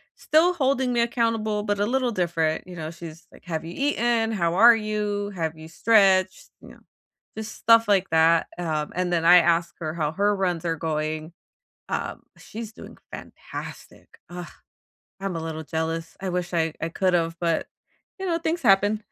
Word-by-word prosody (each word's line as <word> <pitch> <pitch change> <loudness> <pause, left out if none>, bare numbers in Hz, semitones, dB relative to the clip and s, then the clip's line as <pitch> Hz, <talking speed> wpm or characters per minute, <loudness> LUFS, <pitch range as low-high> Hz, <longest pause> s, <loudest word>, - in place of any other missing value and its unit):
still 330 +4 +3
holding 265 -5 +1
me 240 - 0
accountable, 230 -3 0
but 205 -1 -1
a 205 - +2
little 255 +2 0
different, 170 -4 -1
you 180 - -9
know? 160 -2 -5
She's 165 -1 -11
like, - - -18
"Have 160 -3 -3
you 165 +1 -8
eaten? 235 -3 +1
How 170 -4 0
are 230 +4 +8
you? 210 -2 -2
Have 160 -2 -2
you 155 0 -10
stretched?" 190 -1 +3
Ya - - -13
know, - - -16 0.6
just 220 0 -6
stuff 230 0 +4
like 195 -2 +2
that, 160 +1 +4
um, 155 -4 -2
and 180 0 -1
then 165 -1 +1
I 175 +1 +9
ask 170 0 +2
her 155 -2 -4
how 155 -3 -1
her 205 +3 +1
runs 180 -3 -1
are 165 -1 0
going, 155 0 -3 0.6
um, - - -4
she's 225 -1 -8
doing - - -12
fantastic, - - -10
ugh. 175 0 -7 0.7
I'm 195 -3 -3
a - - -3
little 160 -1 -5
jealous, 165 +1 -3
I 190 - -3
wish 180 0 -3
I 165 -1 +1
I 165 - -2
could've, 170 -2 0
but, 170 -2 0 0.5
you 385 - -5
know, 335 -2 0
things 335 +1 -2
happen. 205 +2 +3
180 Hz, 180 wpm, -24 LUFS, 165-220 Hz, 0.7 s, I